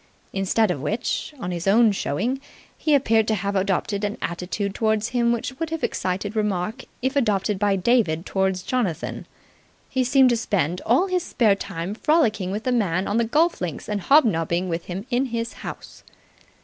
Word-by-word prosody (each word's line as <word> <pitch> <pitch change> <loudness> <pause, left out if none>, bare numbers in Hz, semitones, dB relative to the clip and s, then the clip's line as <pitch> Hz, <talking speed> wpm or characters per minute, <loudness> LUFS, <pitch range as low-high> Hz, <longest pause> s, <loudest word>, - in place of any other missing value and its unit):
Instead 195 +2 +2
of 145 - -3
which, 215 - -2
on 180 -5 -4
his 175 +1 -4
own 220 +2 +5
showing, 225 - -2 0.3
he 305 -2 +2
appeared 225 -5 +3
to 220 - +2
have 200 +1 -2
adopted 200 +1 0
an 205 0 -2
attitude 185 +3 -3
towards 220 +1 0
him 240 -1 +2
which 240 +2 -3
would 330 -1 -2
have 325 -1 -4
excited 195 +3 -2
remark 210 +3 -1 0.2
if 260 +2 0
adopted 210 -6 +1
by 205 -1 +2
David 185 -5 +2
towards 190 -1 0
Jonathan. 220 -10 -2 0.6
He 260 - +1
seemed 255 0 +5
to 235 - +2
spend 180 -6 -1
all 255 - +4
his 365 -2 0
spare 225 -10 +2
time 195 -1 -4
frolicking 220 - +1
with 210 +3 -3
the 255 - 0
man 195 -6 +1
on 205 - 0
the 235 - +3
golf 320 +9 +2
links 170 -5 -4
and 205 -1 -2
hobnobbing 180 - +3
with 165 0 -3
him 185 +3 -5
in 250 +2 +2
his 230 -2 -3
house. - - -8
210 Hz, 180 wpm, -23 LUFS, 185-245 Hz, 0.6 s, own